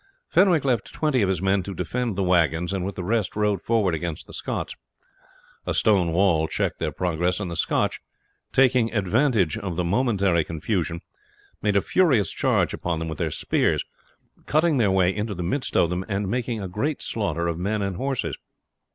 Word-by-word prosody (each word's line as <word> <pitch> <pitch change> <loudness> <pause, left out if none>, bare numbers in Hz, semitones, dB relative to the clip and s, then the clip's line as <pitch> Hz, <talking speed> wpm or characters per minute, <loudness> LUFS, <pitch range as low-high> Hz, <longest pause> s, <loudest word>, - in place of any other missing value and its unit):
Fenwick 180 -6 +4
left 120 -6 0
twenty 150 -6 +1
of 100 - +2
his 95 -2 -1
men 95 0 +2
to 95 +1 -7
defend 120 +2 -2
the 95 - 0
wagons, 85 0 +2
and 95 -2 -2
with 100 +1 -4
the 90 - -4
rest 110 +2 -1
rode 105 -3 +1
forward 110 -6 +1
against 80 0 -4
the - - -14
Scots. - - -4 0.9
A - - 0
stone 95 -6 +3
wall 85 -3 +3
checked - - -2
their 75 -1 -1
progress, 90 +2 -1
and 95 -4 -4
the - - -4
Scotch, - - 0 0.5
taking 125 -3 +3
advantage 110 - +1
of 95 -5 -4
the 90 - 0
momentary 100 -4 +2
confusion, 85 +1 -2 0.6
made 105 -1 +1
a 100 - +4
furious 135 - +3
charge - - +1
upon 85 -2 -2
them 80 0 -4
with 80 - -6
their - - 0
spears, - - 0 0.6
cutting 155 0 +3
their 110 -5 +3
way 95 -1 +2
into 105 0 -3
the 90 - -4
midst 125 +11 -1
of 85 - +3
them 90 +1 -2
and 100 0 -1
making 120 +1 -2
a 95 - -4
great 135 - -2
slaughter 100 -6 -1
of 85 0 -2
men 100 +3 -1
and 95 -2 -2
horses. 130 - -2
100 Hz, 190 wpm, -24 LUFS, 90-115 Hz, 0.9 s, Fenwick